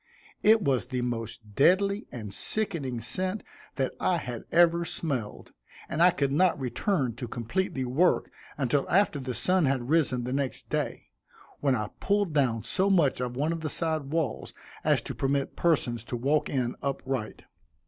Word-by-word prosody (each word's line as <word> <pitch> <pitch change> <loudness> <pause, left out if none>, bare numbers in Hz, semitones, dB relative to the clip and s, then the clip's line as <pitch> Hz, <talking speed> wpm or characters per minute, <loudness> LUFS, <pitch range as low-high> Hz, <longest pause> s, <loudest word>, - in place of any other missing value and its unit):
It 220 0 +5
was 130 -5 +1
the 125 -2 -2
most 115 -3 -5
deadly 200 - +3
and 105 -5 -7
sickening 160 - -2
scent 185 - -2 0.3
that 135 -1 -1
I 180 - +2
have 125 -7 -6
ever 170 0 +5
smelled, 140 -10 -3 0.4
and 155 - -2
I 180 - +8
could 145 -6 0
not 170 +2 +3
return 130 - 0
to 120 - -5
complete 120 - -2
the 130 -1 -1
work 145 +9 +2 0.3
until 135 0 0
after 190 -5 +3
the 130 -2 -4
sun 185 +3 +2
had 130 -2 -1
risen 140 -6 +2
the 125 +1 -3
next 140 -1 -3
day, - - -3 0.5
when 135 -3 +2
I 105 -3 -2
pulled 200 -4 +1
down 120 -7 +1
so 190 - +1
much 160 -10 +3
of 125 -1 -3
one 155 +4 +1
of 165 - -5
the 155 - -2
side 160 -2 -1
walls, 155 0 -2 0.3
as - - +2
to - - -5
permit 140 0 -1
persons 125 -9 +1
to 120 - -4
walk 140 +5 +1
in 125 -3 -1
upright. 135 -4 -3
140 Hz, 170 wpm, -28 LUFS, 125-170 Hz, 0.5 s, I